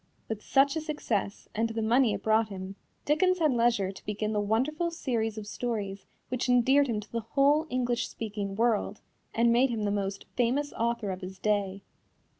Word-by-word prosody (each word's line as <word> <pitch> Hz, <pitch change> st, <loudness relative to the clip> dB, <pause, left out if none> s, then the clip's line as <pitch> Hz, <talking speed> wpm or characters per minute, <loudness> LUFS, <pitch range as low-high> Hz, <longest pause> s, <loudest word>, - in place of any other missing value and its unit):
With 220 Hz, -2 st, -4 dB
such 275 Hz, +5 st, +3 dB
a 320 Hz, -, -1 dB
success, 245 Hz, -10 st, -3 dB
and 225 Hz, +2 st, 0 dB
the 225 Hz, 0 st, -3 dB
money 235 Hz, 0 st, +3 dB
it -, -, -7 dB
brought 220 Hz, 0 st, +3 dB
him, 190 Hz, 0 st, -7 dB, 0.3 s
Dickens 365 Hz, +5 st, +3 dB
had 315 Hz, -4 st, +3 dB
leisure 230 Hz, -5 st, +2 dB
to 195 Hz, -, -13 dB
begin 210 Hz, +1 st, -2 dB
the 210 Hz, -, +1 dB
wonderful 265 Hz, +11 st, 0 dB
series 235 Hz, -9 st, -2 dB
of 215 Hz, -, -5 dB
stories 205 Hz, -3 st, -4 dB, 0.2 s
which 255 Hz, 0 st, -2 dB
endeared 265 Hz, +3 st, +5 dB
him 225 Hz, -4 st, -1 dB
to 210 Hz, -, -15 dB
the 235 Hz, -, -1 dB
whole 280 Hz, +7 st, +2 dB
English 245 Hz, -1 st, 0 dB
speaking 205 Hz, -3 st, -4 dB
world, 220 Hz, -2 st, +1 dB, 0.3 s
and 235 Hz, +1 st, +4 dB
made 255 Hz, +3 st, +4 dB
him 225 Hz, -3 st, -2 dB
the 205 Hz, -, +1 dB
most 195 Hz, -1 st, -2 dB
famous 260 Hz, +4 st, +1 dB
author 230 Hz, -3 st, -1 dB
of 185 Hz, +1 st, -6 dB
his 185 Hz, +1 st, -7 dB
day. 200 Hz, -1 st, -1 dB
225 Hz, 190 wpm, -29 LUFS, 205-255 Hz, 0.3 s, endeared